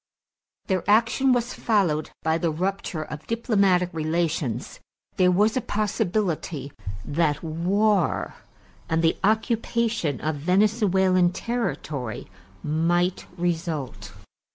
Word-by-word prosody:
Their 185 -3 0
action 230 +5 +4
was 245 0 +1
followed 180 -9 +1
by 160 +1 +1
the 170 - +1
rupture 180 0 -2
of 150 0 -9
diplomatic 200 -6 +2
relations; 155 -6 -2 0.4
there 185 -1 +5
was 205 +5 +3
a 255 - +1
possibility 195 -9 -1 0.3
that 150 0 0
war 185 +5 +1 0.6
and 165 0 +1
the 165 - +3
occupation 220 - 0
of 155 -1 -2
Venezuelan 190 0 +3
territory 150 - -3 0.4
might 175 +4 0
result. 155 - -3
180 Hz, 100 wpm, -25 LUFS, 155-210 Hz, 0.6 s, there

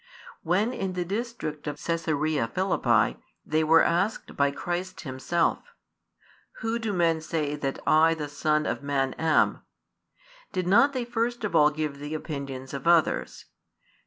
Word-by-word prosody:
When, 195 +8 +1
in 190 -6 -3
the 180 -1 -2
district 200 -8 -4
of 145 0 -4
Caesarea 155 -5 0
Philippi, 120 - +1 0.3
they 155 +1 +1
were 160 +1 +6
asked 180 +6 0
by 140 0 +3
Christ 175 +5 -4
Himself: 135 +4 0 1.0
Who 225 +1 -1
do 225 -2 -2
men 165 -4 +2
say 155 -2 -2
that 135 -2 -3
I 160 +1 +5
the 150 -2 -4
Son 150 +1 0
of - - -2
Man 135 -2 0
am? 160 -1 +2 0.9
did 185 -2 -1
not 235 +10 +5
they 255 -2 -2
first 240 0 -2
of 210 - -2
all 150 0 +6
give 150 -2 -4
the 145 +2 -5
opinions 140 -4 -6
of 140 +4 -5
others? 170 -2 +2
160 Hz, 150 wpm, -27 LUFS, 145-185 Hz, 1.0 s, were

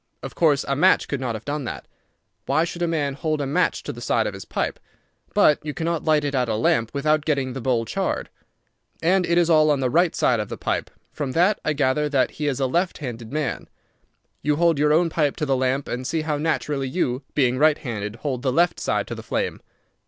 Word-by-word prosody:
Of - - -6
course 150 -4 +2
a 140 - 0
match 145 - +4
could 140 - -2
not 120 -3 -2
have 110 - -8
done 145 0 -3
that. - - -6 0.6
Why 160 - +3
should 170 0 -5
a 175 - +2
man 150 -4 -1
hold 155 +2 -2
a 140 - -1
match 135 - 0
to - - -5
the - - -10
side - - +1
of - - -2
his - - -9
pipe? - - -2 0.6
But 150 - +5
you 150 -1 -5
cannot 165 0 -1
light 155 -2 +3
it 145 -1 -2
at 125 -3 +1
a - - 0
lamp 115 +1 +2
without 150 +2 +1
getting 140 -4 -1
the 135 - -5
bowl 120 -2 +1
charred. - - -2 0.7
And 180 +2 +3
it 170 - +2
is 175 -1 +4
all 155 -2 +5
on 145 -2 +2
the 130 -2 0
right 170 +2 +3
side 120 - +2
of 105 - -3
the - - -5
pipe. - - -2 0.2
From 140 -4 -4
that 185 +5 +3
I 155 - +1
gather 145 +1 +1
that 135 -3 +2
he 150 - -3
is 140 -2 -1
a 135 - +2
left 170 +8 0
handed 120 -5 -7
man. 150 -4 -3 0.7
You 150 0 +1
hold 165 -1 +2
your 150 0 +3
own 165 +2 +3
pipe 150 -4 +1
to 155 - -2
the 135 -2 +1
lamp, 130 +2 0
and 125 +1 -4
see 160 +2 -1
how 155 -1 -1
naturally 145 -3 -1
you, 130 -4 -1
being 130 -3 +2
right 155 0 +5
handed, 105 -4 -5
hold 125 +1 -3
the 130 - 0
left 175 +6 +2
side - - 0
to - - -6
the - - -7
flame. - - -3
145 Hz, 240 wpm, -23 LUFS, 130-155 Hz, 0.7 s, But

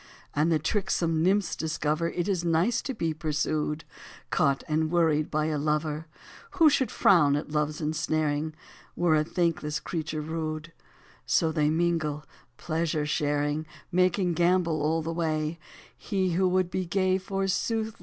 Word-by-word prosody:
72 - - -3
And 165 +2 +2
the 160 - +4
tricksome 170 -2 0
nymphs 185 -1 +2
discover 160 +1 -1
It 175 +1 -2
is 185 -4 0
nice 170 +7 +2
to 265 - -4
be 165 -6 -1
pursued, 155 0 -1 0.5
Caught 140 -1 +2
and 155 +1 +1
worried 160 -3 +2
by 155 0 0
a 155 -2 -1
lover; 150 +1 -1 0.5
Who 320 -4 +7
should 260 -4 +1
frown 150 -10 +4
at 150 +1 -4
Love's 150 +1 -1
ensnaring 155 0 -1 0.4
Were 170 -2 +3
a 155 - +3
thankless 155 -3 -1
creature 155 -1 -4
rude; 155 +1 -4 0.5
So 160 -1 +2
they 150 -1 +2
mingle, 155 -2 0 0.3
pleasure 160 -2 -1
sharing, 150 +1 0 0.2
Making 180 0 +2
gambol 170 -2 +2
all 160 +2 +1
the 165 +1 -3
way: 160 -1 -1 0.4
He 190 -2 -1
who 185 +2 +2
would 180 -1 +1
be 185 -1 -2
gay, 185 +1 +1
forsooth. 195 +4 -1
160 Hz, 150 wpm, -27 LUFS, 155-175 Hz, 0.5 s, Who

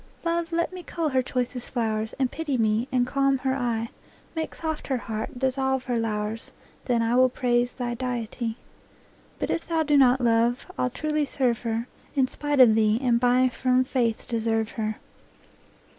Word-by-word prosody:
Love, 335 0 0
let 335 +2 0
me 365 - -6
cull 335 -2 -2
her 260 -2 +2
choicest 250 -1 -3
flowers, 220 -2 -2
And 260 -2 0
pity 295 -4 -2
me, 220 +1 +1
and 250 -1 +2
calm 275 +1 +2
her 265 0 -1
eye; 230 -3 -1 0.5
Make 320 -1 -3
soft 315 -2 -4
her 265 - 0
heart, 225 +2 -5
dissolve 265 0 0
her 250 -1 -2
lowers, 215 0 -3 0.3
Then 235 -2 +1
will 255 +1 +6
I - - +2
praise 245 -1 +2
thy 245 -2 -3
deity, 235 -2 -3 0.8
But - - -2
if 330 - -2
thou 325 -1 +1
do 295 -1 +2
not, 260 -1 +5
Love, 235 +1 +2
I'll 250 - 0
truly 305 +3 -1
serve 250 -4 0
her 230 0 -2 0.3
In 265 -2 +3
spite 290 +1 -2
of 245 -4 +8
thee, 215 0 +3
and 245 -3 +2
by 250 +1 +4
firm 255 +1 +2
faith 245 -4 -1
deserve 225 -1 0
her. 215 -1 -2
250 Hz, 175 wpm, -26 LUFS, 230-270 Hz, 0.8 s, of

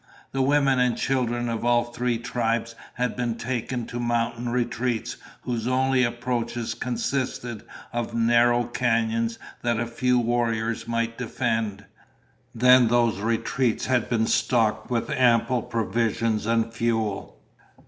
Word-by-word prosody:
The 135 - -1
women 135 -1 +3
and 125 -1 +2
children 120 -2 0
of 115 -1 -3
all 120 0 +3
three 120 0 -2
tribes 115 -1 -1 0.2
had 125 0 -1
been 120 -2 -1
taken 120 0 -3
to 120 - -6
mountain 120 0 -1
retreats 120 -1 -1 0.3
whose 120 -2 -2
only 130 0 +2
approaches 120 -1 -2
consisted 125 -1 -3 0.3
of 120 -1 -3
narrow 120 +1 +4
canyons 115 -1 0 0.2
that 120 -1 0
a 120 - 0
few 125 +2 +1
warriors 115 -2 0
might 115 0 -2
defend. 110 -4 -2 0.7
Then 125 +1 +6
those 115 -3 +2
retreats 115 +3 0
had 130 -2 +1
been 115 -2 +2
stocked 110 -3 +1
with 120 -2 -1
ample 125 0 +3
provisions 115 0 -1
and 115 0 +1
fuel. 115 -3 -2
120 Hz, 130 wpm, -25 LUFS, 115-125 Hz, 0.7 s, Then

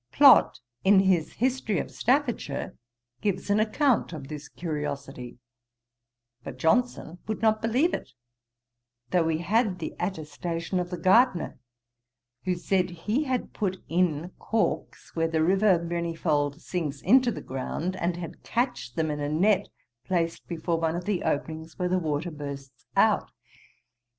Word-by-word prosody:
Plott, 280 -2 +7 0.2
in 195 0 +6
his 185 -5 +2
History 245 -5 0
of - - -3
Staffordshire, 240 - 0 0.5
gives 205 0 -1
an 205 - +4
account 225 - +2
of 140 -3 -7
this 150 -1 -7
curiosity; 145 -6 -5 1.1
but - - -7
Johnson 180 -2 +1
would 220 +1 -3
not 220 -1 +3
believe 250 +10 +2
it, 125 - -5 1.0
though 180 - +4
we 160 -1 +1
had 205 +3 +1
the 165 - -5
attestation 170 0 -3
of 175 0 -3
the 180 - -4
gardener, 185 - +3 0.9
who 185 -1 +1
said, 185 +1 0
he 210 - -1
had 255 -2 -2
put 190 -3 -1
in 170 -1 +1
corks, 225 -2 -2
where 165 -1 +2
the 160 -1 +1
river 190 +2 +4
Manyfold 165 -3 -1
sinks 155 -6 -4
into 250 +6 +5
the - - -5
ground, 150 +7 -3
and 175 -1 -1
had 175 -2 -7
catched 240 - -2
them 160 -1 0
in 150 - -3
a 145 0 -2
net, 190 +6 +2 0.4
placed 170 -1 -1
before 170 0 -1
one 165 0 0
of 175 - -4
the 200 -3 0
openings 160 +2 -3
where 180 -1 0
the 185 +1 +2
water 160 +1 -2
bursts 140 -4 -8
out. - - +3
175 Hz, 145 wpm, -27 LUFS, 160-205 Hz, 1.1 s, Plott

